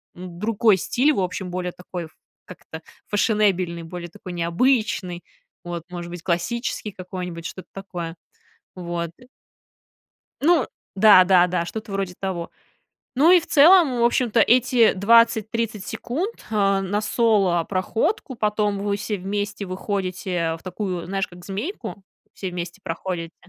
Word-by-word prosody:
м, 175 -1 -9
другой 215 -1 +3
стиль, 265 - +2
в - - -1
общем, 185 0 -3
более 180 0 -3
такой 180 -1 -7
ф 160 - -15 0.3
как-то 160 -3 -10 0.3
фешенебельный, 200 -5 +1
более 175 +1 -7
такой 175 +2 -10
необычный, 180 +1 0 0.4
вот, 175 -1 -5
может 175 -1 -6
быть, 175 -1 -8
классический 210 +5 -2
какой-нибудь, 180 -3 -7
что-то 185 - -7
такое, 175 -4 -6 0.6
вот. 170 -2 -4 1.3
Ну 335 +3 +4 0.3
да, 200 -2 +8
да, 180 -1 +5
да, 175 -1 -1
что-то 215 +3 -7
вроде 195 -2 -2
того. 185 -3 -4 0.6
Ну, 300 +7 +6
и 365 - +8
в 335 - -10
целом, 305 -5 +6
в - - +3
общем-то, 235 -1 +2
эти 240 0 +4
20-30 225 0 +2
секунд, 345 - -4
а, 195 -2 +2
на 195 +2 -1
соло 205 -7 +2
проходку, 220 - -1
потом 210 -2 0
вы 200 0 -1
все 210 +1 -3
вместе 205 +2 -3
выходите, 185 -3 -2
в - - -23
такую, 185 -2 -4
знаешь, 195 +2 -2
как 175 0 -14
змейку, 205 - -5 0.3
все 190 - -5
вместе 175 +2 -6
проходите. 170 0 -4
195 Hz, 140 wpm, -23 LUFS, 175-220 Hz, 1.3 s, да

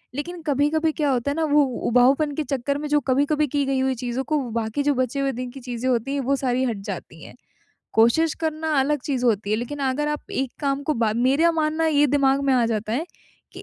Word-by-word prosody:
लेक़िन 340 +5 -5
कभी-कभी 300 +3 +2
क्या 300 -1 -1
होता 255 +2 0
है - - -3
ना 325 - 0
वो 295 0 +5 0.3
उबाऊपन 265 +5 +3
के 310 - -1
चक्कर 280 0 -2
में 300 +1 -4
जो 295 0 +3
कभी-कभी 290 +3 +2
की 285 +1 0
गई 270 -1 0
हुई 265 0 +1
चीज़ों 245 +2 -3
को 305 +2 0
बाकी 225 +4 -2
जो 290 0 +2
बचे 255 +1 -1
हुए 275 0 +1
दिन 250 0 -5
की 270 - -10
चीज़ें 245 0 -3
होती 250 +2 0
हैं, 285 - -1
वो 270 +2 +1
सारी 255 -1 0
हट 235 -4 -2
जाती - - -7
हैं। - - -12 0.6
कोशिश 235 +9 +3
करना 315 0 -2
अलग 295 +2 +1
चीज़ 260 -4 -1
होती 210 -4 +1
है। 215 - +2
लेक़िन 245 +6 -5
अगर 295 +3 -1
आप 300 0 -5
एक 265 -1 -2
काम 280 -1 -1
को 305 +2 -1
बा 225 -2 +1
मेरा 275 +8 +3
मानना 315 0 0
ये 295 -2 +4
दिमाग 275 -1 +2
में 275 - +3
आ 245 -2 +3
जाता 220 -1 -2
है 295 +8 -1 0.5
कि - - -10
275 Hz, 240 wpm, -23 LUFS, 250-295 Hz, 0.6 s, वो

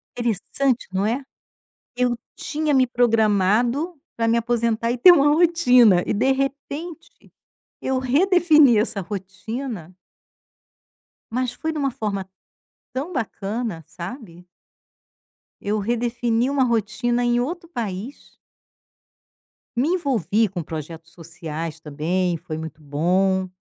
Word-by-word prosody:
Interessante, 240 +3 -1
não 190 +2 0
é. 240 +6 0 0.8
Eu 250 -1 +1 0.2
tinha 305 0 -2
me 260 -1 +4
programado 235 - +2 0.2
para 230 - 0
me 230 - +3
aposentar 235 -1 0
e 245 - -1
ter 360 +8 +9
uma 290 -4 +5
rotina, 250 - +5
e - - 0
de 250 +6 +2
repente 285 +5 -5 0.5
eu 265 0 0
redefini 305 - +4
essa 215 -2 0
rotina 195 - -6 1.4
mas 250 0 -1
foi 320 +5 -3
de 315 - -5
uma 275 -2 0
forma 200 -4 -4 0.6
tão 280 +8 -4
bacana, 215 - -3
sabe. 180 -2 -9 1.1
Eu 210 +1 -1
redefini 235 +2 0
uma 275 -2 +2
rotina 240 +1 0
em 240 0 +2
outro 335 +7 -3
país. 230 - -6 1.4
Me 255 +6 +1
envolvi 230 - +1
com 180 -4 -5
projetos 160 +1 -8
sociais 165 -2 -6
também, 170 +4 -1
foi 155 0 -6
muito 160 0 -8
bom. 185 +6 +1
235 Hz, 115 wpm, -22 LUFS, 190-265 Hz, 1.4 s, ter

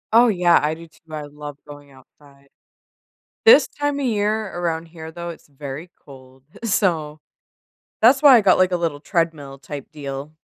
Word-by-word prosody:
Oh, 240 +1 +7
yeah. 180 -5 +4
I 150 +1 -1
do 165 +1 -12
too. 160 - -26
I 155 -1 -5
love 145 0 -10
going 145 -1 -12
outside. 140 +1 -21 1.0
This 465 +2 +7
time 290 -1 -3
of 275 - -1
year 215 -1 0
around 165 -1 -2
here, 160 -1 -10
though, 170 +1 -7
it's 165 - -12
very 145 +4 -8
cold. 130 -1 -16 0.2
So, 165 -8 0 0.8
that's 260 +5 +5
why 280 -4 +9
I - - +5
got, 195 -3 +4
like, 185 0 +3
a - - +2
little 165 -4 -2
treadmill 155 -4 -3
type 140 -1 -8
deal. 140 0 -7
160 Hz, 170 wpm, -21 LUFS, 145-185 Hz, 1.0 s, why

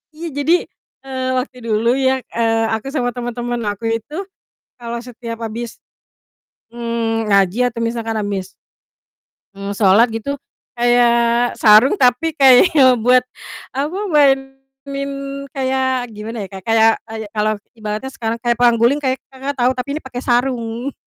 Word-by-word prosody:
Iya 335 +2 -6
jadi, 320 +4 +3 0.5
eee, 260 -1 -4
waktu 255 0 -4
dulu 220 +1 +1
ya, 265 -1 +2
eee, 225 -1 +1
aku 220 +4 -3
sama 245 -4 +1
temen-temen 240 0 -3
aku 205 +3 -8
itu 230 +7 -4 0.6
kalau 235 -1 -5
setiap 235 -2 -8
habis, 230 +1 -5 0.9
mmm, 230 -2 -2
ngaji 200 +1 +3
atau 230 -1 -5
misalkan 230 -1 -2
habis 195 -2 -3 1.1
mmm, 200 0 -5
sholat 205 +3 +5
gitu 225 +6 -3 0.4
kayak 240 0 +3
sarung, 220 - +6
tapi 270 +5 +2
kayak 265 +4 +7 0.3
buat, 250 +2 +4 0.5
apa, 290 +7 -2 0.2
mainin 270 0 0 0.4
kayak, 260 -1 -1
gimana 215 +2 -7
ya, - - -10
Kak, 190 - -7 0.4
oh, 225 0 -9
iya 220 -1 -6
kalau 215 0 +1 0.2
ibaratnya 215 +3 -5
sekarang 225 -2 -3
kayak 235 +1 0
perang 240 -1 +5
guling, 245 +6 +2
kayak 260 -2 0
Kakak 270 +2 -6
tahu? 250 0 +3
Tapi 280 +3 -4
ini - - -6
pakai 245 -1 -6
sarung. 245 0 -1
240 Hz, 140 wpm, -18 LUFS, 225-265 Hz, 1.1 s, kayak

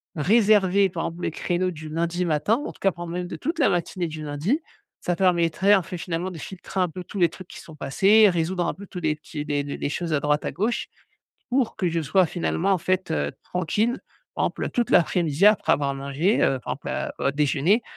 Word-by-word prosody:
réserver 200 +2 +4
par 175 -2 -4
exemple 170 +2 -5
les - - +1
créneaux 180 +3 -1
du 155 -2 -9
lundi 170 +3 -1
matin, 160 +7 +2
en - - -4
tout - - -20
cas 195 - +3
prendre 170 0 -7
même 180 0 -3
de 175 - -6
toute 320 - -3
la 280 - +4
matinée 175 -1 -1
du 155 -1 -7
lundi, 150 - -1 0.4
ça 175 - 0
permettrait 180 +2 +3
en 190 - +1
fait, 180 +1 -6
finalement 170 +2 -3
de 170 - -8
filtrer 190 +3 -6
un 180 -1 +2
peu 180 +3 -7
tous 195 - -7
les 170 -2 +4
trucs 175 +2 -12
qui - - -11
sont 160 - -13
passés. 200 +9 +4
Résoudre 175 +1 -1
un - - -1
peu 200 - -11
tous 180 - -7
les 155 -2 0
petits, 150 -1 -7
les 145 -1 0
le 140 - -5
les - - -3
choses 165 +2 -3
à 150 - +2
droite, 150 +1 +1
à - - -1
gauche 215 +6 -1 0.6
pour 255 -2 +1
que 180 - 0
je 165 0 -1
sois 185 +5 +3
finalement 175 +3 -1
en 190 - +3
fait, 185 +2 -1
heu, 70 -1 -1
tranquille. 205 - -1 0.4
Par - - +1
exemple, - - -3
heu, - - -2
toute 240 -2 -1
l'après-midi, 170 0 +3
après 210 0 +5
avoir 140 -1 0
mangé, 140 +9 0
heu, 135 - +2
par - - -4
exemple - - -11
à - - -3
au 140 - +1
déjeuner 150 - +2
175 Hz, 235 wpm, -24 LUFS, 155-195 Hz, 0.6 s, après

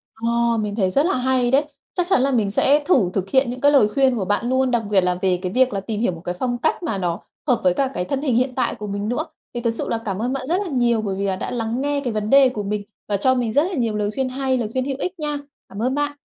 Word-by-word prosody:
Ờ, 235 +1 +1
mình 210 -2 -2
thấy 190 -4 +1
rất 280 +9 +2
là 370 - +1
hay 250 -1 +1
đấy. 280 +3 +3 0.3
Chắc 360 -1 -1
chắn 320 - +4
là 275 - +2
mình 215 -6 +1
sẽ 290 +7 +3
thử 235 - +3
thực 195 0 -2
hiện 265 0 +3
những 250 +1 -6
cái 285 0 +5
lời 270 -8 +5
khuyên 265 +2 +2
của 205 -5 -2
bạn 205 +5 0
luôn, 260 -1 +2
đặc 235 -2 +1
biệt 200 -2 +4
là 180 0 +1
về 185 -2 +1
cái 185 -1 -3
việc 255 +1 +3
là 195 - -1
tìm 210 +2 -4
hiểu 230 - +2
một 165 -1 -9
cái 175 0 -2
phong 245 -1 -1
cách 315 +7 -1
mà 220 -11 -1
nó 175 -2 -2 0.3
hợp 240 -4 +2
với 180 -1 +4
cả 270 +5 +1
cái 180 - -2
thân 275 +7 -2
hình 260 -6 +1
hiện 255 +1 +1
tại - - 0
của 210 - -7
mình 200 +2 -3
nữa. 245 - -1 0.3
Thì 240 - -3
thực 230 -1 +1
sự 230 - -4
là 230 - 0
cảm 195 -2 -2
ơn 250 +3 -1
bạn 265 -1 -4
rất 360 +5 +1
là 405 - -3
nhiều, 240 -5 +2
bởi 200 -3 -2
vì 200 +1 -2
là 190 -1 0
đã - - -5
lắng 235 0 -2
nghe 285 0 0
cái 245 -4 -2
vấn 215 0 -2
đề 275 0 +6
của 215 -4 -4
mình 205 +1 -2 0.2
và 205 - 0
cho 260 +6 +2
mình 235 -3 -1
rất 290 - +4
là 370 +3 -3
nhiều 230 -7 0
lời 210 0 -1
khuyên 265 -1 -1
hay, 260 0 0
lời 230 -4 -2
khuyên 260 0 0
hữu 270 -1 -3
ích 365 -1 -4
nha. 295 -1 -2 0.3
Cảm 200 +2 -7
ơn 255 +3 0
bạn. 290 0 -1
240 Hz, 315 wpm, -21 LUFS, 210-265 Hz, 0.3 s, đề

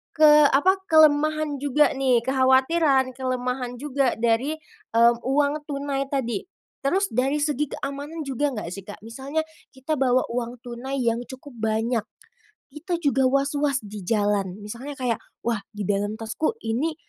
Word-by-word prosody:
ke 310 -1 +7 0.2
apa, 375 +8 +3
kelemahan 310 -1 +4
juga 290 +1 +3
nih, 260 -3 +3
kekhawatiran, 265 +1 +3
kelemahan 250 -1 -2
juga 275 -3 0
dari 235 +5 +1 0.7
uang 290 +3 +1
tunai 280 -1 -2
tadi. 270 - -1 0.4
Terus 380 +8 +2
dari 265 +5 +1
segi 295 -1 0
keamanan 290 +4 -5
juga 275 +2 0
nggak 210 - -5
sih, 195 +1 -7
Kak? 205 - -9
Misalnya 270 +7 -3 0.3
kita 265 +4 -2
bawa 255 -1 +3
uang 240 0 -4
tunai 260 +3 -4
yang 230 0 +1
cukup 260 0 -11
banyak, 220 +1 0 0.7
kita 340 +4 -4
juga 270 -2 +2
waswas 275 +1 +1
di 205 -1 -8
jalan. 205 -4 +1
Misalnya 250 +7 -7
kayak, 245 -3 0 0.3
"Wah, 230 -3 0 0.2
di 205 - -4
dalam 205 +1 0
tasku 270 - -2
ini 285 +8 -1
265 Hz, 140 wpm, -24 LUFS, 235-290 Hz, 0.7 s, ke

